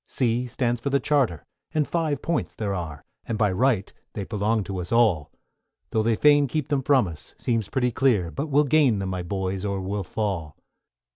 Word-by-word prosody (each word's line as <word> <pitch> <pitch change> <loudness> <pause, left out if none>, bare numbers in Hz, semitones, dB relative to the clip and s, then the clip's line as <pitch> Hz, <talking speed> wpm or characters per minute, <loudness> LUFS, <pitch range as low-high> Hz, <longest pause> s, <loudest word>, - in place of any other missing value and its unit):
=C= 125 0 0
stands 120 -1 -1
for 140 - -1
the 140 0 +2
Charter, 135 - +1 0.3
and 150 -2 +2
five 160 -4 -1
points 165 -8 -1
there 105 -3 -2
are, 80 -6 -5 0.2
And 115 - -2
by 105 -3 +2
right 110 -1 +1 0.2
they 100 - -4
belong 105 +1 0
to 95 0 -5
us 90 0 -6
all; 110 -11 +3 0.6
Tho' 110 - +2
they'd 115 +1 +2
fain 145 -1 +5
keep 150 +1 -2
them 145 -2 +1
from 130 -5 +3
us, 80 -3 -8
seems 115 -4 -1
pretty 125 0 +1
clear, 110 -9 +2
But 140 +4 -3
we'll 145 0 +4
gain 140 -5 +3
them, 95 -1 -3
my 90 -1 -3
boys, 95 +1 -3
or 100 -1 -1
we'll 100 +2 -3
fall! 90 -6 -3
110 Hz, 200 wpm, -25 LUFS, 95-135 Hz, 0.6 s, fain